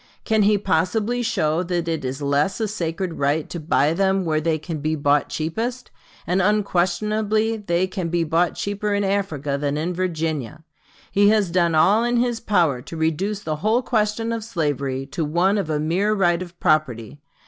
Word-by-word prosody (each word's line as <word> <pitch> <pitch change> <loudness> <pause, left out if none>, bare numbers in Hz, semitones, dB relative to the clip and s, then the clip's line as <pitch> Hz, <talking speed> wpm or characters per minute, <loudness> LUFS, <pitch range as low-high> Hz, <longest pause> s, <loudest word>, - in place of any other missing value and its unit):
Can 220 -1 +2
he 205 +1 +4
possibly 205 +6 0
show 160 -7 0
that 175 -1 -2
it 160 -3 -2
is 130 +3 -4
less 145 +8 +1
a 220 - 0
sacred 175 -3 -3
right 145 +2 +1
to 170 - -4
buy 155 -1 +2
them 190 +1 +1
where 155 -1 0
they 160 0 +1
can 155 0 -6
be 155 +2 -1
bought 145 -1 +1
cheapest? 230 +11 -3 0.3
And 180 +3 +1
unquestionably 210 +3 +1
they 180 -3 0
can 185 -2 -4
be 170 0 +1
bought 165 +2 +1
cheaper 205 +1 -2
in 200 - 0
Africa 160 -8 -1
than 145 0 -1
in 165 +4 -2
Virginia. 160 -5 -3 0.5
He 205 0 +4
has 210 -5 +2
done 170 -2 +2
all 195 +8 +4
in 240 0 +1
his 240 -1 0
power 170 - +1
to 165 - -9
reduce 185 +6 -1
the 155 -4 -2
whole 220 +9 +1
question 225 -1 0
of 225 -1 -3
slavery 145 - -2
to 140 +4 -4
one 175 +7 +2
of 180 -5 -3
a 150 -1 0
mere 185 +8 +1
right 175 -3 +2
of 175 -1 -9
property.... 145 -4 0
175 Hz, 185 wpm, -22 LUFS, 155-205 Hz, 0.5 s, he